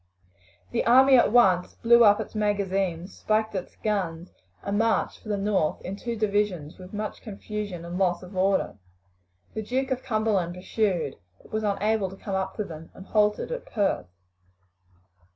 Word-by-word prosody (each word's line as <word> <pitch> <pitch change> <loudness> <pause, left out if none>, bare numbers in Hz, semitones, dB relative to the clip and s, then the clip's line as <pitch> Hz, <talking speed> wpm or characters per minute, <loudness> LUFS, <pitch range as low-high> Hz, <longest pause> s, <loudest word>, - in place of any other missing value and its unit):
The 235 - 0
army 265 +3 +7
at 240 - +5
once 185 -7 +4
blew 235 0 +5
up 205 -2 +6
its - - -5
magazines, 195 -4 -1
spiked 220 0 0
its 185 -2 -5
guns, 180 -5 -2 0.3
and 200 +1 -1
marched 225 0 +1
for 215 - -11
the 205 - 0
north 195 -6 0
in 190 - -5
two 235 +3 -4
divisions 205 -7 -1
with 185 0 -11
much 210 0 -5
confusion 205 -4 -6
and 175 +2 -5
loss 180 -2 +1
of 180 +2 -11
order. 190 - +1 0.7
The 220 - -3
Duke 260 +5 -2
of 260 -1 -1
Cumberland 215 -7 0
pursued, 180 -5 -1 0.3
but - - -18
was 220 - -1
unable 210 -1 0
to 195 - -10
come 195 - -6
up 190 0 -2
to 210 - -2
them, 165 -3 -9
and 190 - -11
halted 210 - +1
at - - -5
Perth. 200 - 0
205 Hz, 170 wpm, -26 LUFS, 185-220 Hz, 0.7 s, army